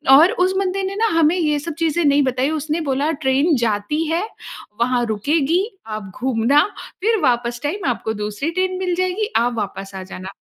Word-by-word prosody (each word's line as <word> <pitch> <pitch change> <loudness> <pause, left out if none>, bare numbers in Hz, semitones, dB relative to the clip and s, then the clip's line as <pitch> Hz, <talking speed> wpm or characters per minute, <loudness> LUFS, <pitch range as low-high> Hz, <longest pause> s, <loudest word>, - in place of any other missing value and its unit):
और 320 +6 +7
उस 375 - 0
बंदे 390 0 0
ने 385 +1 -3
ना 450 +2 +2
हमें 320 +2 +4
ये 300 -3 +1
सब 330 +2 -5
चीज़ें 330 +1 +1
नहीं 285 0 +4
बताई। 260 +2 0
उसने 315 +1 -2
बोला 285 +1 0
ट्रेन 280 +5 +3
जाती 230 +6 0
है 340 +4 +1 0.6
वहाँ 245 0 +2
रुकेगी 290 - +1 0.2
आप 215 -3 -6
घूमना 260 +3 +3 0.4
फिर 445 +3 +2
वापस 240 0 +1
टाइम 335 +5 -2
आपको 220 -2 -2
दूसरी 210 +7 -3
ट्रेन 370 +1 -1
मिल 365 -2 0
जाएगी, 370 +5 -1
आप 240 +1 +1
वापस 195 -2 -4
आ 190 - -5
जाना। 185 0 -8
290 Hz, 185 wpm, -20 LUFS, 235-345 Hz, 0.6 s, और